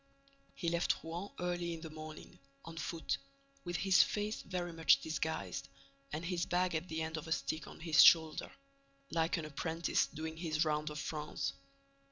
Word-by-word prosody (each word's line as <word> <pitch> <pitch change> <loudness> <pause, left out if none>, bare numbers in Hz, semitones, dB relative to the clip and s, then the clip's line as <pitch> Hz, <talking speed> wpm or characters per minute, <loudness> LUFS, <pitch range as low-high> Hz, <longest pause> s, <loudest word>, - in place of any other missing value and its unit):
He 170 - -3
left 170 +1 +1
Rouen 170 +5 -5
early 175 -1 -1
in 160 - -10
the 160 -2 -7
morning, 155 0 -9 0.3
on 165 - -8
foot, 165 0 -2 0.4
with 175 -1 -4
his 190 +1 +5
face 210 +1 0
very 175 -2 -3
much 165 0 +5
disguised 155 - -3 0.4
and 155 +3 -3
his 175 0 -1
bag 180 0 +2
at 160 +2 -1
the 160 0 -1
end 160 0 -3
of 155 - -6
a - - -7
stick 160 0 -1
on - - -11
his 165 -2 +6
shoulder, 160 -2 +6 0.6
like 165 +2 +1
an 160 - -3
apprentice 160 +3 0
doing 160 +1 -6
his 160 -1 0
round 150 0 0
of 150 - -6
France. 150 +1 -3
165 Hz, 175 wpm, -35 LUFS, 155-175 Hz, 0.6 s, his